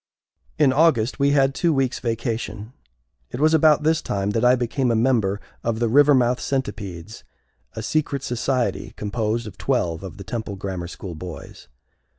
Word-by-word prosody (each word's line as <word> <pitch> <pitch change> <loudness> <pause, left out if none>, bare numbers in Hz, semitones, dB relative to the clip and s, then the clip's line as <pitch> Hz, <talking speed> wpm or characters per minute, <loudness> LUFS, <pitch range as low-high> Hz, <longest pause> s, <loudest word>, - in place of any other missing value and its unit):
In 130 - +4
August 135 -6 +2
we 140 0 +3
had 135 -1 +3
two 170 +4 +1
weeks' 135 -3 0
vacation. 115 -1 -3 0.6
It - - -6
was 155 +2 +4
about 155 -1 +5
this 160 +1 +2
time 100 0 -2
that 115 +2 -1
I 125 +1 +6
became 125 +1 -1
a 115 - +2
member 110 -4 +1 0.2
of 115 -1 -1
the 120 +1 +1
Rivermouth 130 -1 +4
Centipedes, 105 -7 -4 0.5
a 110 - -6
secret 140 +1 -1
society 125 +1 -1
composed 110 +2 -2
of 105 - -10
twelve 85 -2 0
of 95 -3 -8
the 100 - -8
Temple 110 -2 -5
Grammar 95 -3 -5
School 90 +1 -8
boys. 85 +1 -9
120 Hz, 160 wpm, -23 LUFS, 105-135 Hz, 0.6 s, I